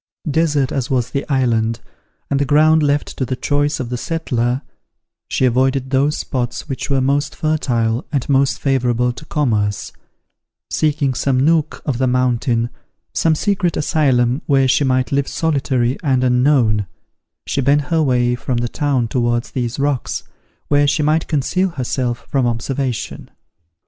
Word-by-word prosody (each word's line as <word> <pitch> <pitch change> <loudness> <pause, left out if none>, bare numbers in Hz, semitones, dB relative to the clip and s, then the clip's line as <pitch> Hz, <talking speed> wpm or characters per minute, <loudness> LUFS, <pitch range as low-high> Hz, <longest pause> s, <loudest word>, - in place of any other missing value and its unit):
Desert 150 -3 +1
as 130 -3 -2
was 125 -3 0
the 140 +1 -3
island, 115 -4 +1 0.5
and 140 - +2
the - - +2
ground 155 +3 +4
left 145 0 0
to - - -1
the 130 0 -2
choice 145 +3 0
of 125 -3 -4
the 125 - -2
settler, 125 -4 -1 0.6
she 130 - +1
avoided 130 +1 +1
those 140 +3 +2
spots 125 0 -3
which 135 -3 -4
were 135 -1 +2
most 140 +3 0
fertile 125 -6 0
and 140 -5 -1
most 135 -1 +2
favorable 125 -3 +1
to 140 - -11
commerce: 105 -10 -1 0.8
seeking 150 -3 +1
some 130 +1 0
nook 155 +2 +1
of 130 -5 -1
the 130 - +2
mountain, 125 -2 +1 0.4
some 160 -1 +2
secret 190 -1 0
asylum 130 -4 +2
where 135 -2 +3
she 130 - +3
might 130 -1 +1
live 140 0 +1
solitary 135 -5 0
and 130 -6 +1
unknown, 125 -5 +2 0.6
she 140 - -1
bent 140 +3 +3
her 165 - +3
way 125 -4 +2
from 125 +1 -2
the 120 0 0
town 135 -2 0
towards 120 0 -1
these 120 -2 -3
rocks, 140 -2 -1 0.4
where 145 0 +3
she 150 +1 +1
might 155 +2 +1
conceal 175 +6 0
herself 125 -5 -3
from 135 -3 +1
observation. 125 +1 -3
135 Hz, 155 wpm, -18 LUFS, 125-145 Hz, 0.8 s, ground